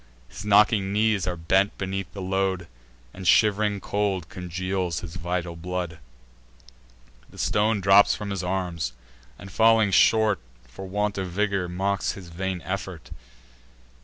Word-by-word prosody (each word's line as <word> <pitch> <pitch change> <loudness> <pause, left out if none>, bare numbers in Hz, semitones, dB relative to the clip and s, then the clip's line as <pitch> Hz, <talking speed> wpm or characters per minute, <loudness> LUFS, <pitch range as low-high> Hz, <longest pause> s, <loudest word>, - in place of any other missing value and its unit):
His 95 - -9
knocking 105 -1 +4
knees 105 -2 +1
are 90 - -1
bent 95 +4 +1
beneath 95 0 -4
the 100 - -7
load, 95 -2 -1 0.5
And 95 -1 -6
shiv'ring 105 0 +3
cold 100 -4 -2
congeals 90 0 -3
his 85 -1 -8
vital 85 0 -3
blood. 90 -1 -4 1.3
The - - -16
stone 105 0 +1
drops 100 +2 +6
from 105 -1 -5
his 100 -2 -2
arms, 90 -7 -2 0.4
and, 100 -1 -11
falling 110 -1 +4
short 110 +1 +4 0.3
For 80 +11 -9
want 105 +1 -1
of 95 -1 -3
vigour, 100 -1 -1
mocks 95 +2 -1
his 90 -4 -11
vain 90 +1 -4
effort. 90 -3 -5
95 Hz, 135 wpm, -25 LUFS, 90-100 Hz, 1.3 s, drops